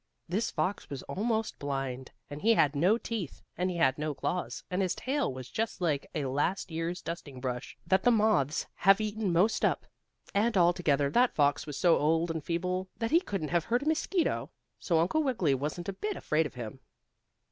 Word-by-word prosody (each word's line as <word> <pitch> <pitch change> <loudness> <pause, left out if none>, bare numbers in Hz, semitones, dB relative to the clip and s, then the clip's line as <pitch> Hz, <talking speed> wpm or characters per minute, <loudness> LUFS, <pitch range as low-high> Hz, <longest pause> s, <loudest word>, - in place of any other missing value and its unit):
This 200 +7 0
fox 190 +2 -2
was 140 -2 -6
almost 220 +2 -2
blind, 135 -2 -3 0.2
and 145 +1 -8
he 225 +1 +5
had 145 -6 +3
no 180 +10 +4
teeth, 225 - -5
and 180 +2 0
he 180 - -3
had 135 -3 +3
no 150 -1 -2
claws, 180 +5 -3
and 180 +2 0
his 185 -2 0
tail 275 - -1
was 130 -1 -7
just 225 +10 -3
like 155 -6 0
a 150 -3 -1
last 145 +8 -1
year's 165 +2 -3
dusting 150 -6 -6
brush, 125 -1 -4
that 190 0 +3
the 245 - +4
moths 210 - +2
have 195 +2 +5
eaten 215 -2 -1
most 185 +6 +2
up, - - +1 0.5
and 210 +1 +2
altogether 170 -6 +3
that 245 +1 +3
fox 145 0 +2
was 145 -2 -5
so 175 -3 +4
old 165 +3 +2
and 160 -2 -4
feeble 180 +3 -1
that 230 +1 -2
he 335 - +6
couldn't 195 - -3
have 170 -2 +1
hurt 240 +3 +1
a - - -4
mosquito. 320 +3 0 0.3
So 170 - +1
Uncle 175 - +2
Wiggily 225 - +1
wasn't 150 +6 -3
a 195 - -2
bit 415 - -3
afraid 155 0 +1
of - - -17
him. 120 +1 -7
175 Hz, 200 wpm, -30 LUFS, 145-215 Hz, 0.5 s, he